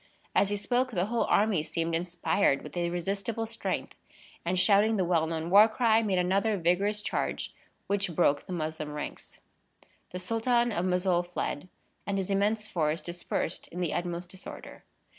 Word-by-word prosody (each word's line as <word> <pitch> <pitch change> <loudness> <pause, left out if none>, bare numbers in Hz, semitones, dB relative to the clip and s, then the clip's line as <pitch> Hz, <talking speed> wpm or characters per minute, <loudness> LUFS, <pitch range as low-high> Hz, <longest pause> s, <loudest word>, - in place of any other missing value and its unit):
As 200 - +3
he 205 - -1
spoke, 245 +5 +1
the 185 -6 0
whole 230 +2 0
army 205 -6 +3
seemed 165 +1 -2
inspired 175 -2 +1
with 150 - -10
irresistible 195 +6 -2
strength; 225 +1 -3 0.5
and, 180 +2 0
shouting 210 +3 +4
the 185 - +1
well 165 -2 +2
known 165 +1 -3
war 205 +3 +9
cry, 225 -1 +3
made 200 -4 0
another 195 +4 +2
vigorous 195 +5 +1
charge - - -2 0.3
which 200 -4 -1
broke 145 -1 +2
the - - -7
Moslem 155 -3 -3
ranks. 150 - -7 0.7
The 180 - -6
Sultan 235 +5 +1
of 180 -3 -1
Mossoul 180 -1 +2
fled, 175 -1 -4 0.4
and 200 -1 0
his 195 0 -2
immense 210 +2 +1
force 155 -3 -1
dispersed 175 -1 -3
in 180 - -8
the 175 -3 -1
utmost 175 0 -3
disorder. 190 +1 -10
185 Hz, 160 wpm, -29 LUFS, 170-210 Hz, 0.7 s, war